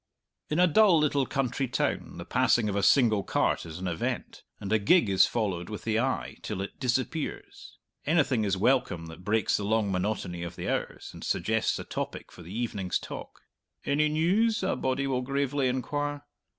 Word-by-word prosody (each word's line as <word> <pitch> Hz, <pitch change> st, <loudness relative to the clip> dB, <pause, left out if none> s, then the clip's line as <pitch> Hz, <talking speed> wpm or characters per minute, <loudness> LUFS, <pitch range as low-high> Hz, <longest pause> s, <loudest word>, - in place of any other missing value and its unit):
In 150 Hz, -, 0 dB
a 180 Hz, -, +6 dB
dull 185 Hz, +1 st, +5 dB
little 145 Hz, -3 st, +2 dB
country 135 Hz, -1 st, -1 dB
town -, -, -2 dB
the -, -, -7 dB
passing 115 Hz, -3 st, +2 dB
of 100 Hz, -, -2 dB
a 100 Hz, -, +1 dB
single 110 Hz, -1 st, +4 dB
cart 85 Hz, -, 0 dB
is 80 Hz, 0 st, -7 dB
an 95 Hz, +1 st, -4 dB
event, 85 Hz, -2 st, -3 dB, 0.2 s
and 100 Hz, +1 st, -3 dB
a 110 Hz, -, +4 dB
gig 110 Hz, -, +4 dB
is 95 Hz, -, +5 dB
followed 95 Hz, -7 st, -2 dB
with 105 Hz, -, -6 dB
the 110 Hz, -1 st, +1 dB
eye 130 Hz, +2 st, -2 dB
till 105 Hz, -3 st, -4 dB
it 100 Hz, -, -9 dB
disappears. 130 Hz, +5 st, -3 dB, 0.3 s
Anything 145 Hz, -7 st, +2 dB
is 100 Hz, -2 st, 0 dB
welcome 125 Hz, -6 st, +1 dB
that 80 Hz, +2 st, -11 dB
breaks 110 Hz, +3 st, +1 dB
the 105 Hz, -, -4 dB
long 105 Hz, -1 st, +1 dB
monotony 90 Hz, -2 st, -2 dB
of 85 Hz, -1 st, -6 dB
the -, -, -5 dB
hours -, -, -3 dB
and -, -, -10 dB
suggests 110 Hz, 0 st, 0 dB
a -, -, -5 dB
topic -, -, -5 dB
for -, -, -13 dB
the 85 Hz, +1 st, -11 dB
evening's 105 Hz, -4 st, -2 dB
talk. -, -, -9 dB, 0.4 s
"Any 150 Hz, +2 st, +2 dB
news?" 195 Hz, +8 st, +2 dB
a 190 Hz, -, +1 dB
body 130 Hz, +1 st, -1 dB
will 130 Hz, -2 st, 0 dB
gravely 140 Hz, +1 st, 0 dB
inquire. 145 Hz, +3 st, -2 dB
120 Hz, 190 wpm, -28 LUFS, 100-145 Hz, 0.4 s, a